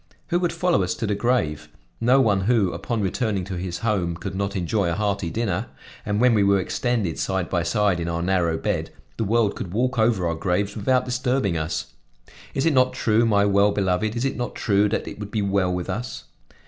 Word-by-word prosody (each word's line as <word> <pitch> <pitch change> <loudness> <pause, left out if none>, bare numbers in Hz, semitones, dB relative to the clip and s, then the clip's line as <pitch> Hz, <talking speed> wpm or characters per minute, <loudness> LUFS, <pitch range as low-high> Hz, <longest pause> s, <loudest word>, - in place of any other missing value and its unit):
Who 175 - +2
would 175 -1 0
follow 180 - +1
us 90 - -1
to 115 - -3
the 105 - 0
grave? 80 -11 0 0.3
No 125 +4 +4
one 105 -7 +3
who, 110 -5 +2
upon 115 -3 -3
returning 100 0 -1
to 95 +2 -6
his 90 -1 -4
home, 90 -6 0
could 95 +2 -6
not 100 +1 -2
enjoy 95 +1 0
a 85 - -1
hearty 100 -3 -1
dinner; 100 -1 -2 0.4
and 105 0 0
when 125 0 +5
we 105 - +3
were 100 0 +4
extended 105 -2 -1
side 95 -2 -1
by 85 - +1
side 100 +1 +1
in 85 - -3
our 85 0 -2
narrow 85 -3 +1
bed, - - -2 0.3
the - - 0
world 110 0 +1
could 90 - -6
walk 125 +4 0
over 110 -5 +2
our 85 - 0
graves 95 +5 -1
without 125 +4 +1
disturbing 125 -6 0
us. 80 -1 -3 0.6
Is 135 - 0
it 165 - +3
not 130 -1 +3
true, 115 -2 +2
my 100 -2 +3
well 100 0 +4
beloved, 100 +2 0
is 120 +3 -1
it 135 - -1
not 120 0 -4
true 105 0 +2
that - - -2
it - - -8
would 105 -1 -6
be 105 -1 -1
well 100 -2 +1
with 90 -1 -3
us? 120 +2 -4
100 Hz, 220 wpm, -23 LUFS, 90-120 Hz, 0.6 s, when